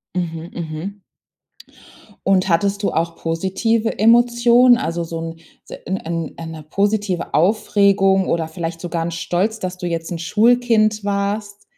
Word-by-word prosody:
Mhm, 165 Hz, -1 st, -4 dB
mhm. 170 Hz, +5 st, -6 dB, 1.3 s
Und, 190 Hz, -1 st, +3 dB
hattest 200 Hz, +4 st, +1 dB
du -, -, +1 dB
auch 165 Hz, +1 st, -1 dB
positive 190 Hz, +7 st, -1 dB
Emotionen? 240 Hz, +2 st, +5 dB
Also, 170 Hz, -4 st, -2 dB
so 165 Hz, 0 st, -5 dB
‘n 165 Hz, 0 st, -6 dB, 0.3 s
s -, -, -7 dB
‘n 190 Hz, -, -1 dB, 0.4 s
‘n 165 Hz, -1 st, -7 dB
‘ne 160 Hz, -1 st, -8 dB
positive 200 Hz, -1 st, -1 dB
Aufregung 195 Hz, 0 st, +3 dB
oder 165 Hz, -1 st, 0 dB
vielleicht 165 Hz, 0 st, -5 dB
sogar 170 Hz, -2 st, -3 dB
‘n 170 Hz, -, -2 dB
Stolz, 180 Hz, +6 st, -1 dB
dass 185 Hz, -1 st, -5 dB
du 180 Hz, -, -5 dB
jetzt 165 Hz, 0 st, -3 dB
‘n 170 Hz, -, -4 dB
Schulkind 215 Hz, +3 st, +2 dB
warst? 205 Hz, +1 st, -2 dB
190 Hz, 145 wpm, -19 LUFS, 165-215 Hz, 1.3 s, Emotionen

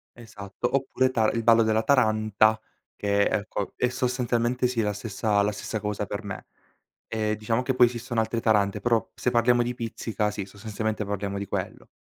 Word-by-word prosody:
Esatto, 115 Hz, +1 st, -5 dB
oppure 130 Hz, -1 st, +1 dB
tar 110 Hz, -4 st, +1 dB
il 115 Hz, -, 0 dB
ballo 115 Hz, 0 st, +6 dB
della 110 Hz, 0 st, +2 dB
taranta, 110 Hz, -3 st, +3 dB, 0.4 s
che 100 Hz, 0 st, +1 dB
ecco, 100 Hz, -1 st, -2 dB
è 125 Hz, -, +1 dB
sostanzialmente 125 Hz, -1 st, 0 dB
sì, 120 Hz, -2 st, -1 dB
la 105 Hz, -1 st, 0 dB
stessa 105 Hz, 0 st, 0 dB
la 105 Hz, +1 st, +1 dB
stessa 105 Hz, +1 st, -4 dB
cosa 105 Hz, 0 st, -3 dB
per -, -, -5 dB
me. -, -, -7 dB, 0.6 s
Ehm, 110 Hz, -1 st, -1 dB
diciamo 115 Hz, +3 st, -1 dB
che 130 Hz, -, 0 dB
poi 125 Hz, -1 st, +7 dB
esistono 120 Hz, -1 st, -2 dB
altre 115 Hz, +1 st, -2 dB
tarante 105 Hz, -2 st, +2 dB
però 115 Hz, +1 st, +1 dB
se 125 Hz, -, -1 dB
parliamo 120 Hz, +1 st, +3 dB
di 120 Hz, +1 st, -2 dB
pizzica 110 Hz, -3 st, -2 dB
sì, 100 Hz, -2 st, -5 dB
sostanzialmente 110 Hz, +1 st, -4 dB
parliamo 100 Hz, 0 st, -3 dB
di 100 Hz, -, -3 dB
quello; -, -, -5 dB
110 Hz, 180 wpm, -26 LUFS, 105-120 Hz, 0.6 s, poi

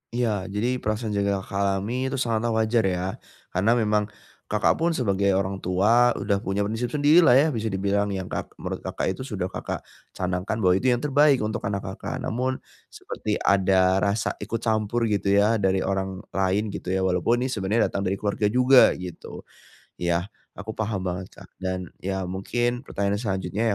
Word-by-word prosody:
Iya. 110 Hz, -6 st, 0 dB
Jadi 120 Hz, +6 st, -1 dB
perasaan 110 Hz, 0 st, -2 dB
jaga 100 Hz, -1 st, 0 dB
Kakak 100 Hz, -, -5 dB
alami 110 Hz, +7 st, -1 dB
itu 135 Hz, -, -2 dB
sangatlah 115 Hz, -3 st, 0 dB
wajar 110 Hz, +1 st, +2 dB
ya. 90 Hz, +1 st, -2 dB, 0.3 s
Karena 105 Hz, +6 st, +2 dB
memang 105 Hz, -3 st, +1 dB, 0.4 s
Kakak 105 Hz, 0 st, +1 dB
pun 165 Hz, 0 st, +1 dB
sebagai 100 Hz, -6 st, +1 dB
orang 95 Hz, 0 st, -1 dB
tua, 115 Hz, +7 st, +3 dB
udah 100 Hz, -1 st, 0 dB
punya 100 Hz, +1 st, -1 dB
prinsip 110 Hz, +4 st, -2 dB
sendiri 150 Hz, +5 st, +4 dB
lah 165 Hz, -8 st, +6 dB
ya. 140 Hz, +4 st, +5 dB
Bisa 115 Hz, -4 st, -2 dB
dibilang 100 Hz, +1 st, 0 dB
yang 95 Hz, -1 st, -5 dB
kak -, -, -3 dB
menurut -, -, -5 dB
Kakak -, -, -2 dB
itu 130 Hz, +8 st, -6 dB
sudah 95 Hz, -6 st, -3 dB
Kakak -, -, -5 dB, 0.3 s
canangkan 90 Hz, +3 st, -2 dB
bahwa 90 Hz, -, +5 dB
itu 130 Hz, -, -1 dB
yang 120 Hz, -1 st, +2 dB
terbaik 145 Hz, -3 st, +4 dB
untuk 110 Hz, +2 st, -2 dB
anak 100 Hz, 0 st, -2 dB
Kakak. 95 Hz, 0 st, -5 dB
Namun, 130 Hz, +3 st, -1 dB, 0.3 s
seperti -, -, -4 dB
ada 95 Hz, -1 st, +3 dB
rasa 100 Hz, +2 st, 0 dB
ikut 115 Hz, 0 st, -4 dB
campur 110 Hz, +1 st, 0 dB
gitu 100 Hz, -1 st, +2 dB
ya, 105 Hz, +2 st, +3 dB
dari 95 Hz, -1 st, +1 dB
orang 95 Hz, -1 st, -2 dB
lain 95 Hz, +2 st, 0 dB
gitu -, -, -7 dB
ya. 95 Hz, -, 0 dB
Walaupun 95 Hz, +7 st, +1 dB
ini 130 Hz, -, -2 dB
sebenarnya 105 Hz, 0 st, +1 dB
datang 100 Hz, 0 st, -2 dB
dari 95 Hz, -, 0 dB
keluarga 105 Hz, +1 st, -1 dB
juga 125 Hz, +4 st, +6 dB
gitu. 90 Hz, -2 st, -8 dB, 0.6 s
Ya, 85 Hz, +3 st, -1 dB, 0.2 s
aku 100 Hz, +2 st, -7 dB
paham 105 Hz, -3 st, -2 dB
banget 90 Hz, 0 st, -4 dB
Kak. -, -, -17 dB
Dan 95 Hz, -1 st, -4 dB
ya 95 Hz, 0 st, -3 dB
mungkin 120 Hz, +7 st, -2 dB
pertanyaan 100 Hz, 0 st, -1 dB
selanjutnya 100 Hz, +1 st, -1 dB
100 Hz, 180 wpm, -25 LUFS, 95-115 Hz, 0.6 s, lah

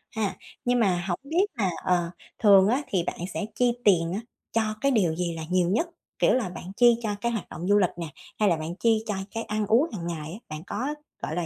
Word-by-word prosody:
ha. 215 Hz, -3 st, -1 dB, 0.3 s
Nhưng 245 Hz, 0 st, +3 dB
mà 180 Hz, -5 st, +2 dB
hổng 175 Hz, -, -1 dB
biết 335 Hz, +8 st, +2 dB
là, 195 Hz, -4 st, +2 dB
ờ, 175 Hz, -2 st, +1 dB, 0.3 s
thường 200 Hz, -2 st, +7 dB
á, 255 Hz, +6 st, +2 dB
thì 180 Hz, -4 st, 0 dB
bạn -, -, -4 dB
sẽ 210 Hz, -, -2 dB
chi 245 Hz, -1 st, +3 dB
tiền 170 Hz, -4 st, +4 dB
á, 210 Hz, -, -2 dB, 0.3 s
cho 225 Hz, -, +2 dB, 0.2 s
cái 275 Hz, 0 st, +3 dB
điều 180 Hz, -9 st, +2 dB
gì 175 Hz, -1 st, -1 dB
là 160 Hz, -, -5 dB
nhiều 180 Hz, -1 st, +2 dB
nhất? 325 Hz, -, +1 dB, 0.3 s
Kiểu -, -, +4 dB
là, 235 Hz, -8 st, +1 dB
bạn 180 Hz, +1 st, -8 dB
chi 240 Hz, -1 st, +6 dB
cho 215 Hz, -, -1 dB
cái 235 Hz, 0 st, +1 dB
hoạt 220 Hz, -4 st, -4 dB
động 175 Hz, +4 st, -5 dB
du 205 Hz, 0 st, +5 dB
lịch 185 Hz, -4 st, +4 dB
nè, 170 Hz, -2 st, -4 dB, 0.3 s
hay 210 Hz, -2 st, +4 dB
là 170 Hz, -, +3 dB
bạn 160 Hz, +2 st, -5 dB
chi 225 Hz, +1 st, +2 dB
cho 210 Hz, -, -1 dB, 0.2 s
cái 225 Hz, 0 st, -3 dB
ăn 215 Hz, 0 st, -1 dB
uống 245 Hz, +10 st, +4 dB
hàng 170 Hz, -4 st, -4 dB
ngày 160 Hz, -2 st, -4 dB
á? 210 Hz, -, -8 dB
Bạn 155 Hz, +1 st, -6 dB
có, 270 Hz, +8 st, -2 dB, 0.3 s
gọi 155 Hz, -, -3 dB
là, 175 Hz, -1 st, -1 dB
200 Hz, 250 wpm, -26 LUFS, 175-230 Hz, 0.3 s, thường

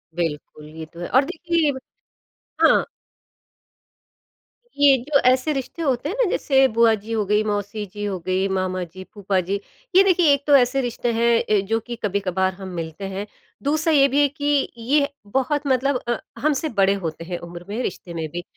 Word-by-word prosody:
बिल्कुल, 150 Hz, -2 st, -4 dB
ये 160 Hz, 0 st, -8 dB
तो 170 Hz, -, -12 dB
है 175 Hz, -, -4 dB
और 260 Hz, +3 st, +4 dB
देखिए 330 Hz, -1 st, 0 dB
ब 265 Hz, -, -7 dB, 0.8 s
हाँ। -, -, +5 dB, 2.0 s
ये 280 Hz, -2 st, +6 dB
जो 285 Hz, -2 st, +4 dB
ऐसे 260 Hz, +4 st, +2 dB
रिश्ते 275 Hz, +4 st, -5 dB
होते 275 Hz, -1 st, 0 dB
हैं 395 Hz, -, -3 dB
ना, 390 Hz, -, 0 dB
जैसे 270 Hz, -1 st, +3 dB
बुआ 230 Hz, -1 st, +4 dB
जी 215 Hz, +2 st, -10 dB
हो 215 Hz, -2 st, 0 dB
गई, 210 Hz, +2 st, +2 dB
मौसी 205 Hz, 0 st, -3 dB
जी 205 Hz, -, -6 dB
हो 190 Hz, -3 st, -3 dB
गई, 185 Hz, +1 st, +1 dB
मामा 185 Hz, -1 st, -1 dB
जी, 185 Hz, +2 st, -10 dB
फूफा 200 Hz, -2 st, -1 dB
जी 195 Hz, +3 st, -2 dB, 0.4 s
ये 385 Hz, -, +8 dB
देखिए 350 Hz, -6 st, +4 dB
एक 280 Hz, 0 st, -1 dB
तो 285 Hz, -, +6 dB
ऐसे 270 Hz, +1 st, +3 dB
रिश्ते 240 Hz, -1 st, -2 dB
हैं 230 Hz, 0 st, +3 dB
अ, 210 Hz, -2 st, +2 dB
जो 225 Hz, +3 st, 0 dB
कि 235 Hz, +2 st, -7 dB
कभी-कभार 190 Hz, -2 st, 0 dB
हम 190 Hz, 0 st, -9 dB
मिलते 165 Hz, +3 st, -5 dB
हैं। 200 Hz, +2 st, -3 dB, 0.4 s
दूसरा 310 Hz, +3 st, +1 dB
ये 275 Hz, -1 st, +6 dB
भी 280 Hz, +2 st, +2 dB
है 285 Hz, -, +5 dB
कि 285 Hz, 0 st, 0 dB
ये 265 Hz, +6 st, +2 dB
ह 280 Hz, -, 0 dB, 0.2 s
बहुत 285 Hz, +2 st, 0 dB
मतलब 265 Hz, +1 st, +2 dB
अ, 240 Hz, -, 0 dB, 0.2 s
हमसे 305 Hz, +1 st, 0 dB
बड़े 195 Hz, 0 st, +4 dB
होते 165 Hz, 0 st, -4 dB
हैं 175 Hz, 0 st, -4 dB
उम्र 175 Hz, 0 st, -10 dB
में, 225 Hz, +5 st, -3 dB
रिश्ते 175 Hz, -1 st, -5 dB
में 165 Hz, -1 st, -3 dB
भी, 175 Hz, +2 st, -6 dB
225 Hz, 195 wpm, -22 LUFS, 190-280 Hz, 2.0 s, ये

